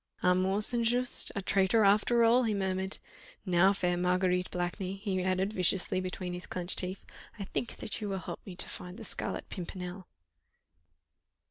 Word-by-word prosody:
"Armand 185 +3 +2
St. 235 +1 +2
Just 245 +2 +6
a 200 - -3
traitor 195 +3 +3
after 210 +4 +4
all," 235 +2 +5
he 220 -4 0
murmured. 190 0 -1 0.5
"Now, 185 +1 +4
fair 180 -3 0
Marguerite 180 0 +1
Blakeney," 180 +2 -3
he 195 -2 -2
added 185 +2 0
viciously 185 -1 +1
between 185 -1 -5
his 180 +1 -5
clenched 180 0 0
teeth, 185 +1 -4 0.3
"I 205 - -5
think 230 +4 -4
that 215 - -5
you 210 - -3
will 195 - -2
help 185 - -7
me 185 - -9
to - - -4
find 180 +1 -9
the - - -9
Scarlet - - -4
Pimpernel." 180 0 -7
190 Hz, 165 wpm, -30 LUFS, 180-205 Hz, 0.5 s, Just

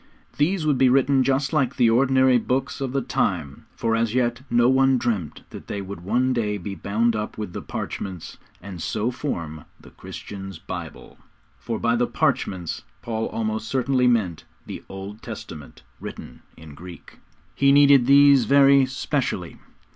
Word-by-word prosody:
These 165 +2 +1
would 145 -4 +1
be 130 -1 +5
written 135 +1 +3
just 135 +2 0
like 135 -4 +1
the 120 -3 +3
ordinary 130 +1 +4
books 135 +4 -2
of 135 -2 -2
the 135 0 -1
time, 75 -8 -2
for 115 -1 0
as 115 0 0
yet 120 -1 0
no 120 0 +3
one 135 0 +4
dreamt 110 -10 -3
that - - -10
they 100 - -4
would 100 -2 -7
one 125 +8 +1
day 105 -4 -1
be 100 +1 -6
bound 110 +6 0
up 105 0 -4
with 105 -4 -5
the - - -5
'parchments,' 95 -4 -6 0.2
and 95 -3 -8
so 110 +7 -1
form 85 - -5 0.2
the - - -16
Christians' 95 -2 -9
Bible. - - -9 0.4
For 115 - -4
by 115 0 +1
the 120 0 +1
'parchments' 90 -4 -1 0.2
Paul 110 -1 -2
almost 110 -1 -3
certainly 130 +1 +1
meant 105 -10 0 0.2
the - - -8
Old 100 +2 -8
Testament 75 -3 -9 0.2
written - - -9 0.2
in 80 -2 -12
Greek. 85 +4 -12 0.3
He 140 0 +3
needed 140 -3 +6
these 140 -2 +6
very 140 +1 +5
'specially.' 130 - -3
120 Hz, 160 wpm, -23 LUFS, 100-135 Hz, 0.4 s, needed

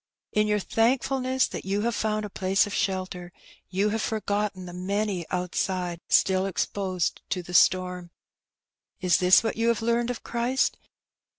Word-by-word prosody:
In 210 0 +2
your 210 0 +2
thank 225 +5 +1
fulness 260 -1 0
that - - -6
you 200 +2 -1
have 235 +2 0
found 215 0 -1
a - - -6
place 190 +1 +2
of 205 - -6
shelter^ 185 -2 -2 0.4
you 195 +3 +1
have 220 +1 -1
forgotten 205 -3 -2
the 175 - -9
many 190 -1 -2
outside 180 -1 -2
still 190 0 +3
exposed 185 -2 -2
to 180 -2 -2
the 175 - -10
storm. 180 -1 +3 0.9
Is 180 -4 +3
this 180 +4 +5
what 225 - -2
you 230 +1 +1
have 230 -1 +1
learnt 235 +1 +1
of 245 - -4
Christ? 245 +3 0
200 Hz, 165 wpm, -26 LUFS, 185-225 Hz, 0.9 s, this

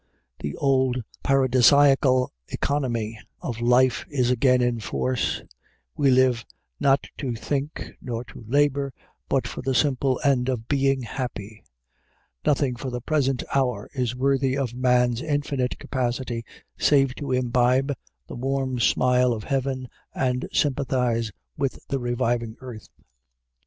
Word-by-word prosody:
The 75 - -4
old 130 -3 +1 0.2
paradisiacal 135 0 +4 0.2
economy 120 -6 -2 0.2
of 115 -1 -5
life 125 +1 +3
is 125 -4 +1
again 125 +1 +3
in 120 -1 +1
force: 125 +4 -1 0.5
we 140 - +3
live, 125 -2 +3 0.4
not 135 0 +3
to 125 -5 -2
think 140 +5 -3
nor 120 -2 -4
to - - -12
labor, 140 +1 +1 0.4
but - - +1
for - - -6
the 130 0 -1
simple 135 -2 +2
end 135 -3 +2
of 115 -3 -3
being 135 -2 +1
happy; 110 -3 -6 0.8
nothing 135 -3 +1
for 130 +2 -5
the 125 -1 -3
present 135 -1 0
hour 125 -6 0
is 125 -3 -1
worthy 135 0 +1
of 130 -4 -2
man's 125 -1 +2
infinite 145 -4 -1
capacity 125 -2 -2 0.4
save 135 -3 +4
to 140 -1 -5
imbibe 125 +2 +2 0.3
the - - -9
warm 130 0 -1
smile 125 +1 +3
of 110 -2 -5
heaven 130 -1 -2 0.3
and 125 -1 -1
sympathize 125 -5 0 0.3
with 135 - -1
the 135 - 0
reviving 120 -2 -1
earth. 125 -5 -10
130 Hz, 130 wpm, -24 LUFS, 120-135 Hz, 0.8 s, paradisiacal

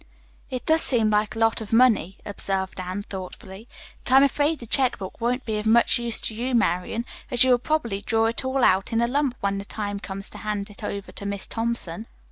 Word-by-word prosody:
"It 255 -2 -5
does 320 0 +4
seem 225 -4 +3
like 210 0 +1
a - - -7
lot 225 0 +2
of 215 - -8
money," 225 -6 +3
observed 195 -2 -1
Anne 185 +2 -4
thoughtfully, 190 +2 -9 0.4
"but - - -2
I'm 270 +1 +8
afraid 290 +3 +2
the 235 - -10
check 260 +2 +2
book 190 +2 -8
won't 250 +2 -1
be 215 -2 -1
of 210 - -3
much 235 +2 +4
use 235 -1 0
to - - -1
you, 245 +3 -2
Marian, 220 +2 0 0.2
as 245 0 +4
you 260 - +4
will 245 - +5
probably 235 -8 -1
draw 225 +2 +1
it 230 +3 +2
all 260 0 0
out 190 +1 +3
in 225 - +1
a 235 - +2
lump 275 0 0
when 200 0 0
the - - -5
time 205 -1 -4
comes 195 0 -7
to - - -10
hand 210 -1 -3
it 205 - -11
over 200 -1 -5
to 200 - -6
Miss 200 -1 -1
Thompson." 225 -3 -3
225 Hz, 230 wpm, -24 LUFS, 200-245 Hz, 0.4 s, I'm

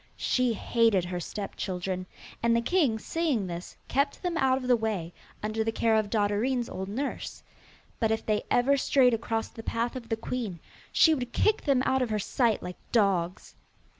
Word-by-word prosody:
She 250 -2 +1
hated 225 -4 +2
her 180 0 -3
step 200 +4 -5
children, 185 0 -3 0.3
and 230 0 +3
the 235 - +3
king, 280 -7 +2
seeing 285 - -1
this, 175 0 -7
kept 280 +5 0
them 355 -1 -1
out 265 -4 +3
of 255 -1 -5
the 250 - +5
way, 210 -7 -2 0.3
under 215 +1 -1
the 225 - 0
care 225 0 +2
of 215 -2 +1
Dotterine's 225 +4 +1
old 190 +1 -5
nurse. 265 +7 -4 0.6
But 225 - +2
if 220 0 -1
they 210 -1 +1
ever 275 +3 +3
strayed 260 -2 +4
across 225 0 -1
the 225 - -9
path 230 +2 -2
of 235 -3 -7
the 225 - 0
queen, 225 -6 -4 0.3
she 320 - +6
would 250 -5 -3
kick 435 0 +2
them 270 -3 +3
out 265 0 +2
of 250 - 0
her 215 - 0
sight 225 +1 +1
like 180 0 -6
dogs. 190 -5 +1
225 Hz, 190 wpm, -28 LUFS, 205-255 Hz, 0.6 s, she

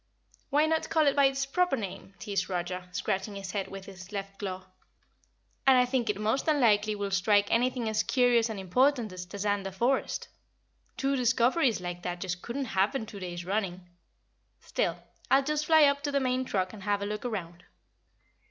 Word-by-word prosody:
"Why 295 +2 +3
not 320 0 0
call 315 -2 +3
it 280 - +3
by 280 -1 +5
its 270 0 +1
proper 360 +1 +1
name?" 195 -2 -7
teased 200 -4 -2
Roger, 180 0 -3
scratching 190 +3 -2
his 195 -1 -6
head 200 -2 -2
with 195 -1 -9
his 190 -1 -11
left 195 -1 -6
claw. 190 -2 -5 1.0
"And 265 -1 +7
I 250 - +5
think 250 -3 -1
it 210 -1 -1
most 220 +8 0
unlikely 215 -8 +3
we'll 200 -1 -3
strike 200 +2 +3
anything 245 0 +1
as 220 0 +1
curious 245 -2 +3
and 215 -3 -4
important 240 +3 +2
as 180 0 -7
Tazander 200 0 -2
Forest. 240 +8 0 0.7
Two 275 0 +1
discoveries 245 - +2
like 175 0 -5
that 175 0 -4
just 180 -1 -4
couldn't 265 +3 -3
happen 215 +6 +1
two 210 -2 -9
days 175 -2 -6
running. 185 -2 -2 0.7
Still, - - -1 0.3
I'll 275 +1 +5
just 300 +1 -1
fly 315 -1 +7
up 280 -1 +4
to 290 0 -2
the 280 - +2
main 255 -1 0
truck 185 -5 -1
and 210 - -10
have 200 +1 0
a - - -1
look 210 +1 -4
around." 180 -8 -5
210 Hz, 185 wpm, -29 LUFS, 190-260 Hz, 1.0 s, And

